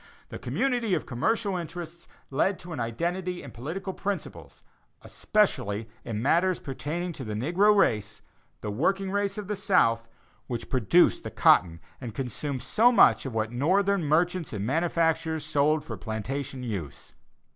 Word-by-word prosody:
This - - -7
community 245 -7 0
of - - -3
commercial 200 - 0
interests 170 0 -7 0.2
led 185 +8 +1
to 175 -1 -9
an 145 - -5
identity 175 +10 -2
in 140 - -9
political 170 +12 -5
principles 200 +1 -5 0.4
especially 120 - 0 0.2
in 110 -1 -4
matters 175 +5 +2
pertaining 150 +7 -4
to 140 - -7
the 110 -3 -4
negro 180 - +3
race 105 - +1 0.4
the 105 - -3
working 190 - 0
race 200 0 -1
of 210 -2 -5
the 210 - -2
South 115 - +2 0.4
which 120 -3 -5
produced 130 - +3
the - - -4
cotton 85 -2 +4 0.2
and 115 -4 -7
consumed 135 +1 -4
so 240 +3 +4
much 115 - +5
of 125 - -6
what 110 0 -1
Northern 190 +9 +2
merchants 170 +2 +1
and 100 -1 -3
manufacturers 160 +1 0
sold 150 +1 +2
for - - -6
plantation 130 +4 -4
use. 90 - -6
155 Hz, 150 wpm, -27 LUFS, 120-185 Hz, 0.4 s, much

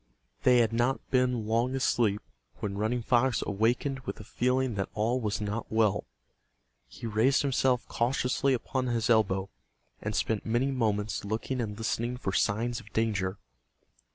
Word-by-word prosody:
They 125 -1 +5
had 115 -2 +3
not 120 +3 0
been 125 -4 +2
long 115 +4 +1
asleep 115 -5 +1 0.3
when 100 -1 -4
Running 115 +3 0
Fox 120 0 +2
awakened 120 +7 0
with 135 - -6
a - - -8
feeling 125 +3 0
that 100 -2 -2
all 115 +4 +1
was 105 -2 -1
not 105 +2 -4
well. 110 -3 +2 0.8
He 65 - -10
raised 115 +6 +3
himself 130 -2 +1
cautiously 130 +2 +1
upon 130 +1 -2
his 120 -1 +1
elbow, 95 -4 +2 0.5
and 105 0 -3
spent 110 -2 0
many 120 +5 +1
moments 110 -5 -1
looking 115 +5 -2
and 105 -3 -4
listening 115 +2 -2
for 95 -6 -3
signs 115 +5 +1
of 105 - -15
danger. 100 -4 0
115 Hz, 155 wpm, -29 LUFS, 105-125 Hz, 0.8 s, They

